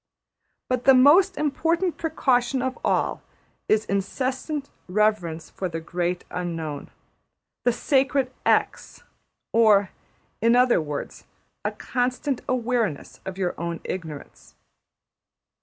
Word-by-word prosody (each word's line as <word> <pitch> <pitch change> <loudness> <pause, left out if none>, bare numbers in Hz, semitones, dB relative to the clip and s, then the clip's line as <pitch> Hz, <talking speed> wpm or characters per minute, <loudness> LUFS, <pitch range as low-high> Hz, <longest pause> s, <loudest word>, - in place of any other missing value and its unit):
But 250 -1 -1
the 270 0 +8
most 340 +9 +6
important 330 +4 0
precaution 260 -5 +1
of 260 0 -2
all - - 0 0.5
is 215 0 +3
incessant 260 +8 -2 0.2
reverence 180 -5 0
for 185 - -4
the 165 -1 -4
Great 175 +2 -2
Unknown, 165 -5 -4 0.8
the 245 - +5
sacred 265 +1 +1
$x$: - - 0 0.5
or, 210 -4 +4 0.5
in 230 +2 +4
other 250 -7 +4
words, 150 -2 -6 0.4
a - - 0
constant 250 +2 -2
awareness 235 - -1
of 190 -1 -6
your 180 -2 -1
own 170 -1 -3
ignorance. 160 -6 -7
235 Hz, 110 wpm, -24 LUFS, 180-265 Hz, 0.8 s, the